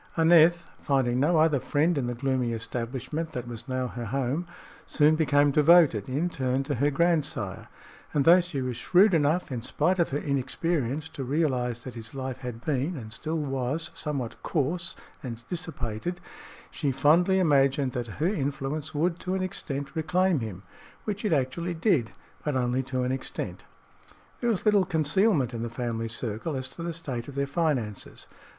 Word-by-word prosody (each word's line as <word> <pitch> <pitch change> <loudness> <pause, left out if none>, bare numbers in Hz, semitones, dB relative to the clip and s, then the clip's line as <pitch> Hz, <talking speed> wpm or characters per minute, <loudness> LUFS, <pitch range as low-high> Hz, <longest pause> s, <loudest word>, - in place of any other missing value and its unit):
Aneth, 170 +1 +6
finding 130 -3 +1
no 160 +5 +3
other 155 -3 +4
friend 155 +7 +1
in 135 -4 -1
the 120 - -2
gloomy 130 -2 0
establishment 125 +7 -4
that 125 -1 -4
was 120 +1 -8
now 130 -1 -1
her 120 -1 -5
home, 135 +8 -1 0.4
soon 150 +1 +4
became 145 -2 +3
devoted, 150 - +5
in 145 +7 0
turn, 130 -4 -1
to 145 - -2
her 140 +3 +2
grandsire, 165 +1 0 0.4
and 145 +1 +1
although 175 +2 +8
she 160 -7 -4
was 125 -2 -3
shrewd 190 - +4
enough, 160 +1 +2
in 120 -3 -3
spite 185 +9 0
of 170 - +2
her 140 - -1
inexperience, 145 +1 -1
to 150 -4 -6
realize 125 -4 0
that 130 - -7
his 115 +2 -9
life 130 -1 -4
had 125 -3 -7
been, 150 +3 0
and 110 -4 -8
still 155 +6 -3
was, 145 +2 -2
somewhat 140 -6 -4
coarse 170 +4 -1 0.3
and 115 -3 -7
dissipated, 165 -2 -4 0.5
she 145 -4 -1
fondly 160 +8 +4
imagined 140 -5 +3
that 120 -1 -3
her 155 - 0
influence 145 -3 -2
would, 170 +3 +1
to 185 +1 -2
an 190 - -1
extent, 140 -5 -5
reclaim 180 +1 +2
him 105 -5 -6 0.4
which 205 -1 -4
it 210 - 0
actually 160 +5 0
did, 160 - +2 0.3
but 150 -2 -1
only 125 0 +1
to 130 -1 -2
an 125 - 0
extent. 130 0 -5 0.7
There 240 - 0
was 215 -5 -1
little 210 -2 +5
concealment 160 - +2
in 115 - -4
the 120 - -3
family 115 -1 -3
circle 115 +6 -3
as 130 -1 -4
to 170 - -10
the 170 0 -2
state 135 -8 -5
of 140 - -9
their 140 0 0
finances. 140 - -2
140 Hz, 175 wpm, -27 LUFS, 125-165 Hz, 0.7 s, although